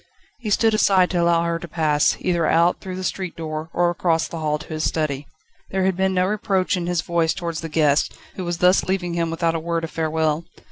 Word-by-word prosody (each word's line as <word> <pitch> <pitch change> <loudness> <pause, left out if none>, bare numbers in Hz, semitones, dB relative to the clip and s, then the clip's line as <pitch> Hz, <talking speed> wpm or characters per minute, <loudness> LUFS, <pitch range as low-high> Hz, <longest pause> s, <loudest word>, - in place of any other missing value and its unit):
He 230 -4 -4
stood 225 +2 +3
aside 190 -4 +4
to 175 -2 +1
allow 170 0 +3
her 170 0 -1
to 175 - -8
pass, 150 -2 +2
either 170 -3 +1
out, 170 +2 +3
through 185 -1 -6
the 185 - -5
street 185 -1 -3
door 155 0 -5
or 175 0 +2
across 165 -1 0
the 165 - -6
hall 150 -1 0
to 150 - -12
his 155 0 -2
study. 150 -2 -1 0.4
There 190 -1 0
had 190 -1 +1
been 190 +1 +1
no 180 0 +3
reproach 195 -2 0
in 175 -1 -3
his 175 -2 0
voice 170 -1 0
towards 170 -2 -4
the 165 - -5
guest, 150 -2 +2 0.2
who 185 - -4
was 175 -1 -2
thus 180 +2 +4
leaving 185 -2 -1
him 170 -1 0
without 165 0 0
a 165 - -1
word 165 0 -2
of 165 - -4
farewell. 160 0 0
170 Hz, 235 wpm, -22 LUFS, 160-185 Hz, 0.4 s, aside